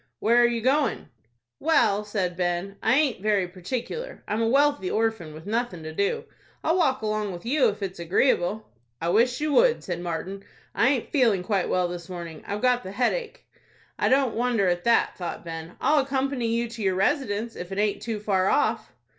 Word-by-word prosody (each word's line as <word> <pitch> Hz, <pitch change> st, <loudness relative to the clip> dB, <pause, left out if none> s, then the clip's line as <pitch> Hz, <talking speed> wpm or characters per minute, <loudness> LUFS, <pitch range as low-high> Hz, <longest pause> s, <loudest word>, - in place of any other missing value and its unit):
"Where 235 Hz, +3 st, +4 dB
are 240 Hz, -, +6 dB
you 235 Hz, -1 st, -1 dB
going?" 270 Hz, -, +1 dB, 0.5 s
"Well," 220 Hz, -10 st, +3 dB
said 195 Hz, -4 st, -2 dB
Ben, 180 Hz, +2 st, -2 dB
"I 225 Hz, +3 st, +3 dB
aint 275 Hz, -8 st, +1 dB
very 205 Hz, -3 st, +1 dB
particular. 250 Hz, -, -5 dB
I'm 215 Hz, +2 st, -1 dB
a 225 Hz, -, +2 dB
wealthy 280 Hz, -6 st, +2 dB
orphan, 220 Hz, -8 st, -1 dB
with 155 Hz, +2 st, -11 dB
nothin' 215 Hz, -5 st, -2 dB
to 160 Hz, 0 st, -6 dB
do. 200 Hz, +4 st, 0 dB, 0.4 s
I'll 325 Hz, -, +2 dB
walk 265 Hz, -9 st, +1 dB
along 215 Hz, -2 st, -1 dB
with 175 Hz, +3 st, -9 dB
you, 255 Hz, -1 st, +3 dB
if 205 Hz, 0 st, -6 dB
it's 190 Hz, -2 st, -5 dB
agreeable." 190 Hz, +3 st, +1 dB, 0.3 s
"I 170 Hz, -, -1 dB
wish 240 Hz, +6 st, +3 dB
you 300 Hz, 0 st, 0 dB
would," 485 Hz, +4 st, +4 dB
said 175 Hz, -2 st, -4 dB
Martin; 180 Hz, +3 st, -4 dB, 0.3 s
"I 250 Hz, -, +3 dB
aint 270 Hz, -4 st, -1 dB
feeling 230 Hz, -10 st, +3 dB
quite 195 Hz, -3 st, 0 dB
well 180 Hz, -1 st, +1 dB
this 175 Hz, 0 st, -7 dB
morning. 170 Hz, -3 st, -7 dB
I've 205 Hz, +3 st, -4 dB
got 250 Hz, -1 st, +3 dB
the 190 Hz, -, -8 dB
headache." 435 Hz, -, -1 dB, 0.5 s
"I -, -, +2 dB
don't 265 Hz, -2 st, +3 dB
wonder 235 Hz, -4 st, +1 dB
at 175 Hz, 0 st, -1 dB
that," 235 Hz, -4 st, +2 dB
thought 175 Hz, -1 st, -5 dB
Ben. 165 Hz, +1 st, -7 dB
"I'll 300 Hz, 0 st, +3 dB
accompany 270 Hz, -2 st, -1 dB
you 230 Hz, +1 st, 0 dB
to 230 Hz, -1 st, -8 dB
your 190 Hz, -2 st, +1 dB
residence, 225 Hz, -, 0 dB
if 180 Hz, +1 st, -7 dB
it 195 Hz, -, -4 dB
aint 210 Hz, 0 st, 0 dB
too 225 Hz, -2 st, -3 dB
far 195 Hz, -3 st, +1 dB
off." 220 Hz, 0 st, +1 dB
215 Hz, 195 wpm, -25 LUFS, 185-250 Hz, 0.5 s, are